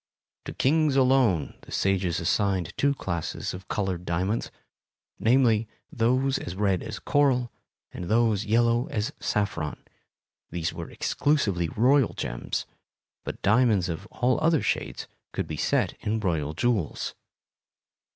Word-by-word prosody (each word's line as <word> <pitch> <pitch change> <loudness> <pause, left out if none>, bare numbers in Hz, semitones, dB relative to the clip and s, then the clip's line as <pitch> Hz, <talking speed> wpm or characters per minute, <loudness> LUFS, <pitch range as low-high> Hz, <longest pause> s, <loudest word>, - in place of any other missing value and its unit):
To - - -5
kings 150 +1 +2
alone 130 - +3
the - - -14
sages 95 -3 +1
assigned 95 0 0
two 140 0 +2
classes 85 - -3
of 90 +1 -9
colored 95 -4 -2
diamonds,—namely, 110 +5 -1 0.2
those 125 -5 0
red 95 -3 +1
as - - -6
coral 130 -4 +2 0.4
and 90 - -6
those 110 0 +2
yellow 115 +3 +2
as 105 0 -2
saffron. 100 -7 -1 0.7
These 85 -1 -2
were - - -7
exclusively 100 - 0
royal 130 - +3
gems, - - -3 0.6
but - - -7
diamonds 105 -3 +3
of 90 +5 -5
all 125 +2 +1
other 160 -2 +3
shades 65 - -2 0.3
could - - -2
be - - -5
set - - +1
in 110 +2 -1
royal 80 -7 -1
jewels. 110 -6 -1
105 Hz, 120 wpm, -26 LUFS, 90-125 Hz, 0.7 s, alone